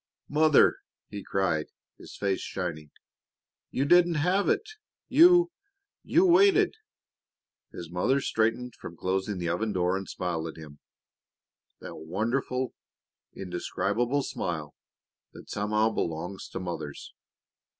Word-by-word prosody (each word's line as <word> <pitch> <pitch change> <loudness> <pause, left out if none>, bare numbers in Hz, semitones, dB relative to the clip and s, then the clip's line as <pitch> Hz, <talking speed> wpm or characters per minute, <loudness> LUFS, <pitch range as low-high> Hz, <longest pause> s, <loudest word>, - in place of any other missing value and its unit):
"Mother!" 155 0 +5 0.3
he 100 -1 -7
cried, 90 -6 0 0.3
his - - -11
face 100 -2 -1
shining. 80 -5 -5 0.8
"You 135 - -1
didn't 175 +2 +5
have 180 +6 +2
it 430 - +1 0.4
You 345 +4 +6 0.5
you 350 +3 +3
waited!" 385 +2 +5 1.0
His 85 -1 -9
mother 120 +10 +1
straightened 115 0 0
from 85 - -10
closing 95 +2 -1
the 85 -1 -2
oven 105 +5 -1
door 90 0 +1
and 95 -1 -5
smiled 85 -3 -3
at 80 - -9
him 75 -2 -12 1.0
that - - -8
wonderful, 115 - -2 0.6
indescribable 105 +8 -1
smile 80 - -4 0.6
that - - -12
somehow 105 +2 +1
belongs 90 +3 -4
to - - -5
mothers. 85 -6 -6
100 Hz, 115 wpm, -28 LUFS, 90-140 Hz, 1.0 s, You